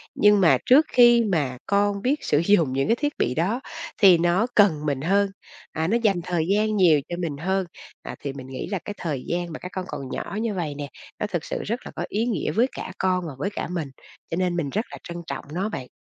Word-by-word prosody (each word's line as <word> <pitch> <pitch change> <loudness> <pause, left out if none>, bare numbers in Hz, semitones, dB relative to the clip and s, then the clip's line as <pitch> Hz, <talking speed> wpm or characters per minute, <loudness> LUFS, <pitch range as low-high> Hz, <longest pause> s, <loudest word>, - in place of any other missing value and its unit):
nhưng 210 -1 +5
mà 170 - +6
trước 290 +5 +6
khi 240 -1 +7
mà 145 -10 0
con 200 0 +1
biết 270 +6 0
sử 145 - +3
dụng 170 -6 +3
những 135 +1 0
cái 230 - +3
thiết 290 +3 -1
bị 125 - +1
đó 200 +11 0 0.4
thì 185 -4 +8
nó 175 +7 +2
cần 160 -8 +4
mình 140 -3 -1
hơn, 195 +5 +2 0.4
à, 160 +1 -1
nó 230 +5 +2
dành 195 -5 +2
thời 175 -3 -1
gian 215 +1 +2
nhiều 165 -6 +5
cho 175 - -3
mình 155 -5 -3
hơn. 190 +4 0 0.4
À, - - -7
thì 140 -2 -5
mình 130 -2 -9
nghĩ 130 - -6
là 195 - -1
cái 205 - -4
thời 145 -6 -3
gian 175 0 -2
mà - - -6
các 180 - -8
con 185 -1 -4
còn 135 -2 -6
nhỏ 200 - -5
như 225 -2 -1
vậy 165 -6 -3
nè, 145 0 -5 0.3
nó 210 - -1
thực 175 -6 -3
sự - - -4
rất 230 +4 -2
là - - -7
có - - -3
ý 215 +3 0
nghĩa 240 -3 -1
với 240 +4 +3
cả - - -6
con 185 -1 +1
và 150 - -6
với 195 +8 -2
cả 205 - -4
mình, 165 -6 -4 0.4
cho - - 0
nên 180 -2 0
mình 145 -5 -1
rất 215 - -1
là - - -7
trân 170 0 -7
trọng - - -5
nó 190 +5 -1
bạn. 130 -10 -6
180 Hz, 255 wpm, -24 LUFS, 155-205 Hz, 0.4 s, thì